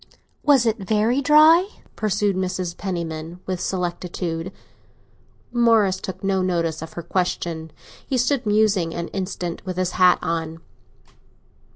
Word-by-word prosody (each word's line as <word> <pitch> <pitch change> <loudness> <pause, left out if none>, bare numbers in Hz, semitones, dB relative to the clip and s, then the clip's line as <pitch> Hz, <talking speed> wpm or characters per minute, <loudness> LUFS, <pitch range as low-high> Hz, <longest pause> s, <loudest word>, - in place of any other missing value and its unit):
"Was 275 -5 +4
it 225 0 +1
very 220 +6 +1
dry?" 310 +6 +6 0.3
pursued 205 -2 0
Mrs. 185 -2 -2
Penniman, 170 -3 -5
with 185 -1 -3
solicitude. 175 -1 -3 1.0
Morris 225 -6 +3
took 190 0 -7
no 195 -1 +1
notice 170 -4 -1
of 160 - -8
her 170 - -6
question; 170 -2 -2 0.4
he 260 - 0
stood 250 -1 +1
musing 205 -6 +2
an 170 0 -4
instant, 180 -3 -4
with 185 -2 -5
his 185 -1 0
hat 180 -1 +5
on. 165 -1 -2
185 Hz, 130 wpm, -22 LUFS, 170-215 Hz, 1.0 s, dry